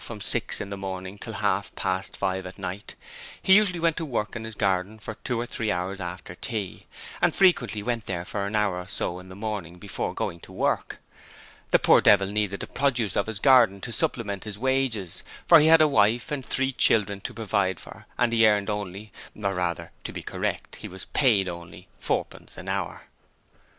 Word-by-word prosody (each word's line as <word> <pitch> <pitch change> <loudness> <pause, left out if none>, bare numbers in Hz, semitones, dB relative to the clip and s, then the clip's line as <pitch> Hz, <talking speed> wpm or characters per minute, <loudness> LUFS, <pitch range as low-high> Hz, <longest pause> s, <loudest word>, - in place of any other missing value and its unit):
from 115 -3 -7
six - - -1
in 100 - -5
the 100 - -4
morning 95 0 -5
till 115 - -6
half 100 -1 -1
past 95 0 -2
five 95 -1 -1
at 90 - -10
night, 95 +3 -6 0.4
he 190 - +4
usually 200 -4 +4
went 165 -1 +2
to - - -3
work 120 -8 -2
in 110 -1 -5
his 110 -1 -7
garden 100 +1 0
for 110 +1 -6
two 120 -3 -1
or 120 - -1
three 115 -3 -2
hours 95 +1 -2
after 90 0 -6
tea, 105 -1 -5 0.3
and - - +3
frequently 125 - +3
went 120 -1 -2
there 90 -2 -3
for 100 0 -3
an 105 - -3
hour 100 -4 +1
or 90 - -8
so 90 -2 -1
in 90 0 -12
the 95 - -10
morning 100 -5 -5
before 100 +2 -4
going 85 - -3
to - - -13
work. - - -1 0.7
The - - +6
poor - - +5
devil 100 - +6
needed 100 -1 -1
the - - -3
produce 120 -8 0
of 100 - +1
his 110 -2 -3
garden 120 -6 +5
to 115 - -5
supplement 105 -3 -2
his 105 -2 -5
wages, 130 -7 0 0.2
for 170 - +8
he 155 - +4
had 165 0 +7
a 155 - +7
wife 120 0 +2
and 145 -3 -2
three 135 +3 0
children 100 -5 +2
to - - -5
provide 100 -5 0
for - - -12
and 120 -1 +2
he 115 -1 +6
earned 105 0 +2
only 105 +1 -5 0.2
or 100 -2 -1
rather, 90 -3 -2
to - - -4
be - - -7
correct, - - -3
he - - -8
was 95 +1 -8
paid 110 -9 +3
only 85 -1 -8
fourpence - - -3
an - - -9
hour. - - -3
105 Hz, 205 wpm, -26 LUFS, 95-120 Hz, 0.7 s, for